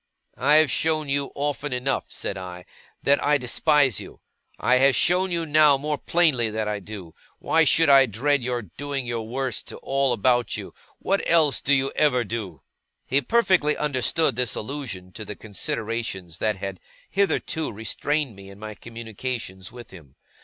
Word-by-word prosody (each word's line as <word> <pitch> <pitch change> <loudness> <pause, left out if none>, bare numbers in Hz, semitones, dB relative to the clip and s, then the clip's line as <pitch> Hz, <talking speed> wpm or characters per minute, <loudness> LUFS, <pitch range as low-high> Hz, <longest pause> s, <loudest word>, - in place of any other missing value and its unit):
'I 140 +4 +3
have 155 -1 +5
shown 155 -2 0
you 140 0 0
often 145 0 -2
enough,' 125 +2 -2
said - - -3
I, 90 -2 -8 0.4
'that 140 +1 +3
I 150 0 +3
despise 135 - +2
you. - - -11 0.4
I 125 - +3
have 135 +1 +4
shown 185 +2 +2
you 170 -2 -1
now, 150 -2 +5
more 150 +1 -2
plainly, 150 -10 +2
that 110 0 -2
I 105 -1 -2
do. 95 -4 -9 0.2
Why 160 0 +2
should 165 +1 +4
I 135 -2 +7
dread 135 +6 +1
your 120 -1 -2
doing 135 - -5
your 115 -2 -4
worst 130 0 -3
to - - -8
all 135 -1 +1
about 120 0 +1
you? - - -8 0.2
What 195 +1 0
else 155 -6 +4
do 140 - -1
you 135 -1 +3
ever 135 -5 +3
do?' 100 - -6 0.4
He 135 +2 +1
perfectly 185 - +2
understood 150 0 +1
this 125 -2 0
allusion 110 -8 -6
to 110 - -8
the 105 0 -7
considerations 105 -4 -4
that 110 -1 0
had 95 -1 -6 0.3
hitherto 190 -5 0
restrained 130 +4 -2
me 100 0 -12
in 100 - -13
my 110 +1 -7
communications 115 -3 -6
with 120 -1 -12
him. 75 -8 -15
125 Hz, 170 wpm, -24 LUFS, 110-145 Hz, 0.4 s, I